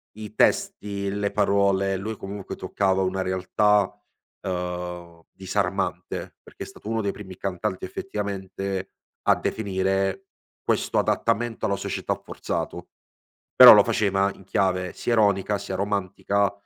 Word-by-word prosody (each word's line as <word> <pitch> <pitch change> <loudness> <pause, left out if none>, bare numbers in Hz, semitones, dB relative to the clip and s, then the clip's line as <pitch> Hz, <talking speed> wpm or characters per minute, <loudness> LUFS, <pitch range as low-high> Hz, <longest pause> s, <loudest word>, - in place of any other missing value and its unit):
i 110 0 -9
testi, 100 -2 +1
le 100 0 -1
parole, 100 -1 +2
lui 110 +4 -4
comunque 100 0 -7
toccava 95 -1 0
una 95 0 0
realtà, 95 +2 +2 0.6
uhm, 90 -2 -5
disarmante 95 -1 -3
perché - - -9
è - - -7
stato - - -13
uno 115 0 0
dei 100 -2 -1
primi 95 -2 -10
cantanti 95 -1 -3
effettivamente 95 - -4 0.3
a - - +5
definire 95 - -1 0.4
questo - - +1
adattamento 115 0 0
alla 100 - +1
società 100 - -2
forzato; - - -5 0.7
però - - +12
lo - - +7
faceva 100 -1 +1
in 95 - -16
chiave 95 -2 0
sia 120 - -1
ironica, 100 -2 +2
sia 100 -1 -5
romantica, 100 0 0
100 Hz, 125 wpm, -25 LUFS, 95-105 Hz, 0.7 s, però